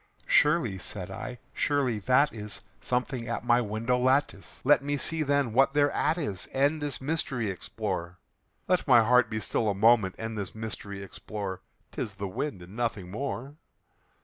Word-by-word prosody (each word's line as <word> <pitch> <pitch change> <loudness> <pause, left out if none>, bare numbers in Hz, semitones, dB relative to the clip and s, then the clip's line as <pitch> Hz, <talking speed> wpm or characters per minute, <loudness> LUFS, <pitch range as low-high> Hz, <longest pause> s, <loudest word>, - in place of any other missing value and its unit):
"Surely," 145 - +3
said 95 -1 -5
I, 125 +5 -6 0.2
"surely 135 -6 +1
that 130 +8 +3
is 105 -2 -5 0.2
something 125 -1 -2
at - - -3
my 120 0 +4
window 115 +3 0
lattice; 130 -5 0
Let 145 +1 +5
me 145 0 -1
see, 160 +3 0
then, 140 -5 +1
what 135 +3 +4
thereat 145 +3 +2
is, 105 - -4
and 145 +3 +2
this 145 -1 -2
mystery 130 -7 -1
explore 90 -2 -4 0.5
Let 180 -2 +1
my 120 -4 +7
heart 125 +2 +4
be 110 - -2
still 110 0 0
a 100 - 0
moment, 110 -2 +4
and 110 0 -4
this 100 -2 -5
mystery 105 -2 -6
explore; 100 -1 -6 0.3
'Tis 100 - -4
the 100 0 -4
wind 95 +1 -4
and 90 +4 -12
nothing 110 -6 -2
more." 135 +4 -4
120 Hz, 165 wpm, -28 LUFS, 100-140 Hz, 0.5 s, my